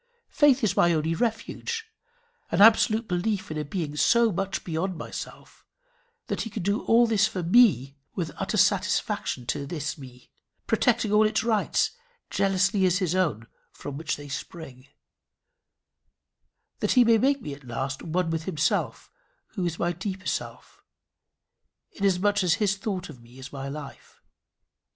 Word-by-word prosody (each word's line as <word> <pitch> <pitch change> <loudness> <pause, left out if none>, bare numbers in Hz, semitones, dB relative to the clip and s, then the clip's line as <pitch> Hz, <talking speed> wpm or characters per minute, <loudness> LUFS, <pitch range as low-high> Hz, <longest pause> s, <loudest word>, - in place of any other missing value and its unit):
Faith 275 -4 +4
is 200 -3 +1
my 175 0 +4
only 160 +1 0
refuge 245 - -3 0.6
an - - -1
absolute 220 +1 +5
belief 190 +1 -2
in 155 - -4
a - - -2
being 150 -1 -4
so 235 +8 +4
much 195 +1 -3
beyond 175 +2 -3
myself, - - -9 0.6
that - - -3
he 225 - -4
can 205 -3 -5
do 200 +3 0
all 235 +1 +5
for - - -3
this 215 -1 +2
me 170 - +4 0.2
with 165 -4 -3
utter - - -2
satisfaction 125 - +1
to 140 +3 -3
this 150 -1 -4
me, 125 -2 -13 0.3
protecting 225 -1 +1
all 210 +1 +5
its 220 +1 0
rights, 220 -3 +1 0.4
jealously 195 0 +1
as 185 -1 +3
his 180 -3 -1
own 160 - 0 0.3
from 145 - -8
which 155 +1 -2
they 145 0 -10
spring, 140 -2 -8 1.9
that - - +1
he 250 - +6
may 230 -1 +4
make 275 +4 +2
me 150 - -6
at 140 0 -12
last 135 +3 -4
one 170 +1 -1
with 165 -1 -3
himself 155 -4 -1 0.4
who 190 - -4
is 165 -1 -4
my 175 - 0
deeper 185 +2 -6
self, - - -5 1.1
inasmuch 200 +1 +1
as 175 -2 +3
his 200 -1 +1
thought 195 -3 -4
of 130 -6 -12
me 120 +2 -17
is 130 +1 -10
my 135 -1 -5
life. 145 0 -10
185 Hz, 155 wpm, -26 LUFS, 150-215 Hz, 1.9 s, he